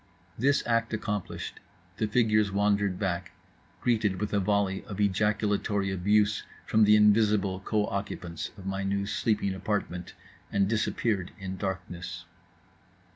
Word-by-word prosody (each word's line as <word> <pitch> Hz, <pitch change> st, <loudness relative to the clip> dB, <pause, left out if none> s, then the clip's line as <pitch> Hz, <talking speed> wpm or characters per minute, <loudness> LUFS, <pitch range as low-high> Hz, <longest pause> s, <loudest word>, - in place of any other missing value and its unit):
This 140 Hz, +5 st, +2 dB
act 115 Hz, -1 st, +1 dB
accomplished, 105 Hz, -4 st, -4 dB, 0.4 s
the 110 Hz, -, 0 dB
figures 105 Hz, -2 st, +3 dB
wandered 100 Hz, -1 st, +1 dB
back, 95 Hz, -2 st, -2 dB, 0.5 s
greeted 110 Hz, -6 st, +1 dB
with 105 Hz, 0 st, -2 dB
a 100 Hz, -, +3 dB
volley 100 Hz, -1 st, +1 dB
of 105 Hz, -4 st, -7 dB
ejaculatory 105 Hz, 0 st, +1 dB
abuse 105 Hz, +3 st, +2 dB, 0.2 s
from 110 Hz, 0 st, +4 dB
the 105 Hz, +1 st, +6 dB
invisible 105 Hz, -2 st, +4 dB
co 105 Hz, +1 st, 0 dB
occupants 95 Hz, -4 st, -4 dB
of 95 Hz, -, -11 dB
my 95 Hz, 0 st, -2 dB
new 100 Hz, 0 st, -1 dB
sleeping 105 Hz, -1 st, 0 dB
apartment; 95 Hz, -2 st, -3 dB, 0.4 s
and 100 Hz, -1 st, +2 dB
disappeared 105 Hz, -3 st, 0 dB
in 95 Hz, -1 st, -5 dB
darkness. 90 Hz, -2 st, -5 dB
100 Hz, 130 wpm, -28 LUFS, 95-105 Hz, 0.5 s, the